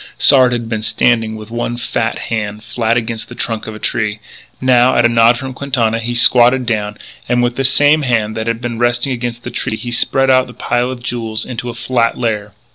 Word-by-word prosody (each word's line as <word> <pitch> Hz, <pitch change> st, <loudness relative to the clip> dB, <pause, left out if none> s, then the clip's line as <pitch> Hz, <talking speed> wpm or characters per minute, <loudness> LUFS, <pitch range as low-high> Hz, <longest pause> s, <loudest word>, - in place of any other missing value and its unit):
Sard 130 Hz, -3 st, +5 dB
had 120 Hz, -2 st, -3 dB
been 110 Hz, -1 st, -3 dB
standing 115 Hz, -1 st, +1 dB
with 110 Hz, 0 st, -10 dB
one 120 Hz, 0 st, -3 dB
fat 115 Hz, -1 st, -2 dB, 0.2 s
hand 105 Hz, -1 st, -3 dB
flat 115 Hz, +1 st, -1 dB
against 115 Hz, -1 st, -4 dB
the -, -, -10 dB
trunk 115 Hz, -2 st, -3 dB
of 110 Hz, -, -7 dB
a -, -, -7 dB
tree. 105 Hz, 0 st, -2 dB, 0.4 s
Now, 130 Hz, 0 st, +3 dB
at 120 Hz, -, +3 dB
a -, -, +7 dB
nod 115 Hz, 0 st, +4 dB
from 130 Hz, +1 st, -6 dB
Quintana, 120 Hz, -5 st, -1 dB
he 120 Hz, +1 st, -4 dB
squatted 125 Hz, +1 st, +5 dB
down, 105 Hz, -2 st, -2 dB, 0.3 s
and, 120 Hz, 0 st, +2 dB
with 120 Hz, 0 st, 0 dB
the 135 Hz, -, -1 dB
same 145 Hz, +3 st, +4 dB
hand 115 Hz, -5 st, 0 dB
that 110 Hz, +1 st, -4 dB
had 115 Hz, 0 st, -2 dB
been 120 Hz, -2 st, -4 dB
resting 120 Hz, +2 st, +1 dB
against 120 Hz, -1 st, -4 dB
the -, -, -6 dB
tree, 110 Hz, -, -3 dB
he 120 Hz, -, -6 dB
spread 135 Hz, +2 st, +2 dB
out 130 Hz, 0 st, +3 dB
the 125 Hz, -, -13 dB
pile 120 Hz, +1 st, -1 dB
of 125 Hz, -2 st, -7 dB
jewels 115 Hz, -3 st, -3 dB
into 125 Hz, -1 st, -5 dB
a 115 Hz, -, -7 dB
flat 120 Hz, -1 st, 0 dB
layer. 105 Hz, -4 st, -2 dB
120 Hz, 220 wpm, -15 LUFS, 115-125 Hz, 0.4 s, a